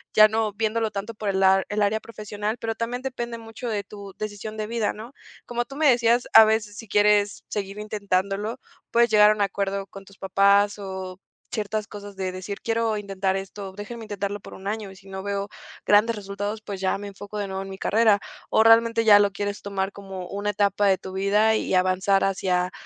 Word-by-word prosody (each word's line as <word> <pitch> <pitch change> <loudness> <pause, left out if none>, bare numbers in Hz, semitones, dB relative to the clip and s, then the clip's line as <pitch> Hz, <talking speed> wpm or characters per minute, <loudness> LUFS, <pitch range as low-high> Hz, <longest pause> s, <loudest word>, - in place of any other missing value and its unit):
ya 215 0 +9
no 220 -1 0
viéndolo 220 +1 -1
tanto 205 +2 -5
por 215 -1 -6
el 190 0 +1
a 190 0 +5
el 210 +1 -1
área 210 +2 +2
profesional, 210 0 -5
pero 225 -1 -3
también 235 +2 -3
depende 240 -3 -4
mucho 225 +2 -8
de 210 -2 -2
tu 200 0 -11
decisión 215 0 -6
de 215 -1 -3
vida, 225 -2 -1
¿no? 230 +5 -10 0.3
Como 240 0 -2
tú 275 - -11
me 300 0 +4
decías 240 -1 +3
a 220 - +10
veces 215 -1 0
si 225 - -9
quieres 205 0 +3
seguir 200 0 -4
intentándolo, 205 +2 -2 0.3
puedes 235 0 +4
llegar 210 -1 +6
a - - +4
un 210 - -3
acuerdo 195 0 -1
con 195 0 -12
tus 195 0 -18
papás 200 +2 +3
o 190 -2 -6 0.3
ciertas 215 -1 -2
cosas 205 -1 -10
de 190 -1 -3
decir: 185 +2 -6
"Quiero 225 -1 0
intentar 195 -1 -2
esto. 195 0 -6
Déjenme 220 +3 -8
intentarlo 205 -1 -4
por - - -12
un 190 - -9
año. 210 -1 -3
Y - - -13
si 195 +1 -16
no 190 0 -6
veo 200 0 -3 0.4
grandes 210 +3 +4
resultados, 205 +1 -5
pues 200 -2 -6
ya 190 0 0
me 205 - -7
enfoco 205 +1 -9
de 200 -1 -2
nuevo 190 0 -4
en 195 - -7
mi 190 - -7
carrera", 215 0 +3 0.3
o 220 - +4
realmente 230 0 +5
ya 210 -2 +8
lo 205 -1 +3
quieres 205 +1 -4
tomar 195 -1 -2
como 195 -2 -8
una 205 +1 -2
etapa 205 0 +1
de 190 -1 +4
tu 190 - -9
vida 205 +3 +3
y - - -2
avanzar 185 +2 +2
hacia, 185 -2 0
205 Hz, 215 wpm, -24 LUFS, 195-220 Hz, 0.4 s, a